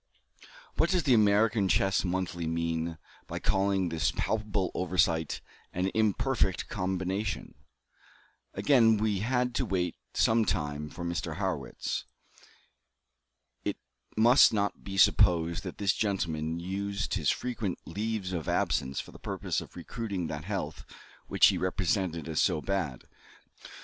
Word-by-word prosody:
What 165 Hz, -, +3 dB
does 180 Hz, -2 st, +2 dB
the 135 Hz, -3 st, +4 dB
American 105 Hz, -1 st, +4 dB
Chess 95 Hz, +1 st, +2 dB
Monthly 90 Hz, -2 st, -2 dB
mean 80 Hz, 0 st, -1 dB, 0.3 s
by -, -, -5 dB
calling 95 Hz, -2 st, +1 dB
this 80 Hz, -3 st, +1 dB
palpable 105 Hz, -3 st, -1 dB
oversight 85 Hz, -3 st, +1 dB, 0.3 s
"an 90 Hz, +2 st, 0 dB
imperfect 110 Hz, -1 st, +1 dB
combination?" 95 Hz, +1 st, -2 dB, 1.0 s
Again 115 Hz, -6 st, +5 dB
we 105 Hz, -2 st, 0 dB
had 125 Hz, +3 st, 0 dB
to -, -, 0 dB
wait 90 Hz, -3 st, -1 dB, 0.2 s
some 110 Hz, 0 st, +4 dB
time 75 Hz, -6 st, -2 dB
for 85 Hz, +2 st, -7 dB
Mr. 85 Hz, 0 st, -3 dB
Harrwitz. -, -, -3 dB, 1.6 s
It -, -, -2 dB, 0.4 s
must 120 Hz, +5 st, +7 dB
not 100 Hz, -1 st, -1 dB
be 95 Hz, 0 st, -6 dB
supposed 85 Hz, -2 st, +4 dB
that 90 Hz, -, -6 dB
this 100 Hz, -1 st, +2 dB
gentleman 85 Hz, -6 st, -1 dB
used 100 Hz, +3 st, -3 dB
his -, -, +1 dB
frequent 115 Hz, -7 st, -2 dB
"leaves 105 Hz, +1 st, -3 dB
of 85 Hz, -4 st, -3 dB
absence" 65 Hz, +1 st, 0 dB
for -, -, -7 dB
the -, -, -14 dB
purpose -, -, -2 dB
of -, -, -12 dB
recruiting 100 Hz, -7 st, -4 dB
that 75 Hz, +1 st, -5 dB
health 95 Hz, -7 st, -4 dB, 0.4 s
which -, -, +5 dB
he -, -, 0 dB
represented 90 Hz, -3 st, -1 dB
as 80 Hz, -1 st, 0 dB
so -, -, +2 dB
bad. 80 Hz, -8 st, -2 dB
95 Hz, 130 wpm, -29 LUFS, 85-105 Hz, 1.6 s, must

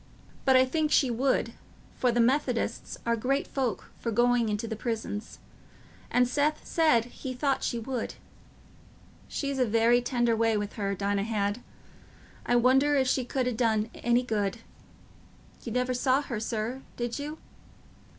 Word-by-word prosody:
But 265 Hz, -1 st, +5 dB
I 255 Hz, 0 st, +6 dB
think 305 Hz, +3 st, 0 dB
she 265 Hz, -4 st, +4 dB
would, 260 Hz, +3 st, +1 dB, 0.4 s
for 250 Hz, -, +2 dB
the 240 Hz, -, 0 dB
Methodists 245 Hz, -1 st, 0 dB
are 235 Hz, 0 st, +2 dB
great 270 Hz, +5 st, 0 dB
folks 255 Hz, -6 st, -2 dB
for 230 Hz, -, -2 dB
going 240 Hz, 0 st, +3 dB
into 210 Hz, +2 st, -2 dB
the 220 Hz, -, -3 dB
prisons; 220 Hz, -1 st, -4 dB, 0.7 s
and 250 Hz, 0 st, +3 dB
Seth 295 Hz, +4 st, 0 dB
said 310 Hz, -9 st, +3 dB
he 255 Hz, +1 st, -7 dB
thought 275 Hz, +1 st, 0 dB
she 235 Hz, -, -1 dB
would. 240 Hz, +1 st, -4 dB, 1.1 s
She'd 280 Hz, -2 st, -3 dB
a 255 Hz, -, +4 dB
very 230 Hz, +2 st, +4 dB
tender 240 Hz, -2 st, +1 dB
way 225 Hz, -1 st, +2 dB
with 205 Hz, 0 st, -3 dB
her, 200 Hz, -2 st, -2 dB
Dinah 200 Hz, +1 st, 0 dB
had; 210 Hz, 0 st, -1 dB, 0.9 s
I 245 Hz, -, +3 dB
wonder 265 Hz, +4 st, +4 dB
if 265 Hz, -2 st, +2 dB
she 255 Hz, 0 st, +1 dB
could 255 Hz, +1 st, -1 dB
ha' 250 Hz, -, -1 dB
done 220 Hz, -1 st, +1 dB
any 240 Hz, +1 st, +1 dB
good. 210 Hz, -3 st, -1 dB, 1.0 s
You 235 Hz, -, -6 dB
never 250 Hz, +2 st, 0 dB
saw 260 Hz, +3 st, +2 dB
her, 235 Hz, -6 st, -4 dB
sir, 230 Hz, +3 st, -3 dB, 0.2 s
did 240 Hz, +2 st, -3 dB
you?" 300 Hz, +2 st, -5 dB
240 Hz, 160 wpm, -28 LUFS, 225-260 Hz, 1.1 s, I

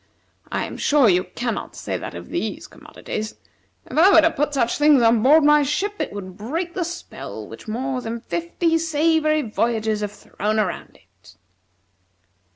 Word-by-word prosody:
I -, -, -1 dB
am -, -, -8 dB
sure 290 Hz, -4 st, +4 dB
you 180 Hz, -2 st, +3 dB
cannot 235 Hz, -2 st, -3 dB
say -, -, -4 dB
that -, -, -6 dB
of -, -, -9 dB
these -, -, -3 dB
commodities. 215 Hz, 0 st, -7 dB, 0.5 s
If -, -, -2 dB
I 375 Hz, +4 st, +7 dB
were 325 Hz, -, +8 dB
to 325 Hz, -, +3 dB
put 295 Hz, -1 st, -1 dB
such 235 Hz, -1 st, 0 dB
things 295 Hz, -4 st, +5 dB
on 225 Hz, -1 st, +4 dB
board 295 Hz, +6 st, +6 dB
my 295 Hz, 0 st, +6 dB
ship, 320 Hz, +8 st, -1 dB
it 305 Hz, -, -3 dB
would 185 Hz, -2 st, -8 dB
break 330 Hz, -, -4 dB
the 365 Hz, -, -1 dB
spell 345 Hz, +1 st, -7 dB
which -, -, -12 dB
more 255 Hz, +4 st, -2 dB
than 235 Hz, 0 st, -4 dB
fifty 200 Hz, -, -1 dB
savory 310 Hz, -1 st, +2 dB
voyages 220 Hz, -1 st, -1 dB
have 205 Hz, -1 st, -3 dB
thrown 210 Hz, +2 st, -3 dB
around 190 Hz, -5 st, -3 dB
it." 95 Hz, +3 st, -22 dB
260 Hz, 170 wpm, -22 LUFS, 215-310 Hz, 0.5 s, were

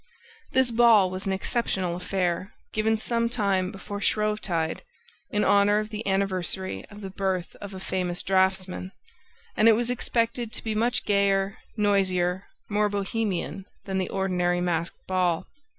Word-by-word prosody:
This 260 Hz, -2 st, +3 dB
ball 225 Hz, -5 st, +6 dB
was 185 Hz, +1 st, -5 dB
an -, -, +1 dB
exceptional 190 Hz, -3 st, -1 dB
affair, 180 Hz, 0 st, -2 dB, 0.2 s
given 220 Hz, +1 st, +2 dB
some 230 Hz, +1 st, 0 dB
time 200 Hz, -5 st, +1 dB
before 205 Hz, 0 st, -7 dB
Shrovetide, 210 Hz, -8 st, 0 dB, 0.5 s
in 210 Hz, -, +1 dB
honor 205 Hz, +1 st, +4 dB
of 215 Hz, 0 st, -1 dB
the 215 Hz, 0 st, -5 dB
anniversary 190 Hz, -, -1 dB
of 205 Hz, +1 st, -11 dB
the 195 Hz, -1 st, -6 dB
birth 190 Hz, -2 st, -2 dB
of 200 Hz, -1 st, -8 dB
a -, -, -6 dB
famous 180 Hz, -2 st, -2 dB
draftsman; 190 Hz, 0 st, +1 dB, 0.6 s
and 215 Hz, -, +4 dB
it 225 Hz, -, +8 dB
was 240 Hz, +2 st, 0 dB
expected 235 Hz, -1 st, -1 dB
to -, -, -5 dB
be 220 Hz, -, -1 dB
much 235 Hz, +2 st, +1 dB
gayer, 200 Hz, -1 st, +2 dB, 0.2 s
noisier, 190 Hz, -3 st, +1 dB, 0.2 s
more 210 Hz, 0 st, +1 dB
Bohemian 200 Hz, -1 st, -2 dB, 0.2 s
than 190 Hz, -1 st, -1 dB
the 185 Hz, -, -1 dB
ordinary 180 Hz, -2 st, +1 dB
masked 170 Hz, -1 st, -2 dB
ball. 180 Hz, -3 st, +1 dB
195 Hz, 150 wpm, -26 LUFS, 185-215 Hz, 0.6 s, it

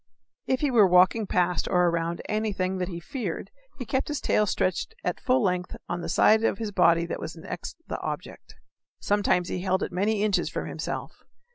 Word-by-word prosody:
If 260 Hz, 0 st, +1 dB
he 290 Hz, -2 st, +1 dB
were 220 Hz, -5 st, +6 dB
walking 185 Hz, +4 st, +4 dB
past 180 Hz, -1 st, +1 dB
or 180 Hz, 0 st, +3 dB
around 170 Hz, 0 st, -1 dB
anything 195 Hz, -4 st, -1 dB
that 180 Hz, -, -1 dB
he 170 Hz, -2 st, -5 dB
feared 250 Hz, -, -5 dB, 0.3 s
he 250 Hz, -, -5 dB
kept 265 Hz, +3 st, -1 dB
his 295 Hz, -1 st, -2 dB
tail 210 Hz, -, +2 dB
stretched 185 Hz, -, -1 dB
at -, -, -2 dB
full 255 Hz, -2 st, +2 dB
length 180 Hz, -2 st, -1 dB
on 175 Hz, -, -3 dB
the -, -, -5 dB
side 220 Hz, +1 st, +4 dB
of 210 Hz, -, +1 dB
his 220 Hz, -2 st, -4 dB
body 170 Hz, -3 st, +4 dB
that 170 Hz, -, -4 dB
was 160 Hz, -, -6 dB
next 170 Hz, +2 st, -7 dB
the -, -, -4 dB
object -, -, -6 dB, 0.4 s
sometimes 200 Hz, -3 st, +1 dB
he 180 Hz, -, -3 dB
held 190 Hz, 0 st, 0 dB
it -, -, -3 dB
many 205 Hz, +3 st, 0 dB
inches 210 Hz, -2 st, +1 dB
from -, -, -4 dB
himself. -, -, -5 dB
190 Hz, 200 wpm, -26 LUFS, 180-220 Hz, 0.4 s, were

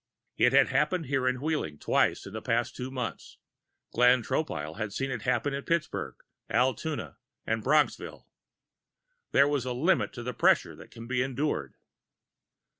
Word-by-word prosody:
It 125 Hz, +2 st, +4 dB
had 135 Hz, 0 st, +5 dB
happened 150 Hz, +5 st, +1 dB
here 135 Hz, -1 st, 0 dB
in 125 Hz, 0 st, 0 dB
Wheeling 150 Hz, -, -2 dB
twice -, -, +1 dB
within 100 Hz, -, -9 dB
the 110 Hz, -, -5 dB
past 120 Hz, 0 st, -1 dB
two 125 Hz, +1 st, -5 dB
months. 125 Hz, -4 st, -6 dB, 0.6 s
Glenn 125 Hz, 0 st, +5 dB
Tropile 80 Hz, -, -3 dB
had 110 Hz, -2 st, -3 dB
seen 135 Hz, +6 st, -2 dB
it 120 Hz, -4 st, -3 dB
happen 125 Hz, +4 st, 0 dB
in 140 Hz, 0 st, -3 dB
Pittsburgh, 170 Hz, -2 st, -2 dB, 0.3 s
Altoona -, -, -1 dB, 0.3 s
and -, -, -1 dB
Bronxville. -, -, +1 dB, 1.1 s
There 140 Hz, -, +5 dB
is 135 Hz, -, -1 dB
a 125 Hz, -, -2 dB
limit 160 Hz, +10 st, +1 dB
to 120 Hz, -, -7 dB
the 125 Hz, +1 st, -4 dB
pressure -, -, +3 dB
that -, -, -13 dB
can 115 Hz, -, -10 dB
be 125 Hz, +1 st, 0 dB
endured. 130 Hz, -, -2 dB
125 Hz, 160 wpm, -28 LUFS, 115-140 Hz, 1.1 s, had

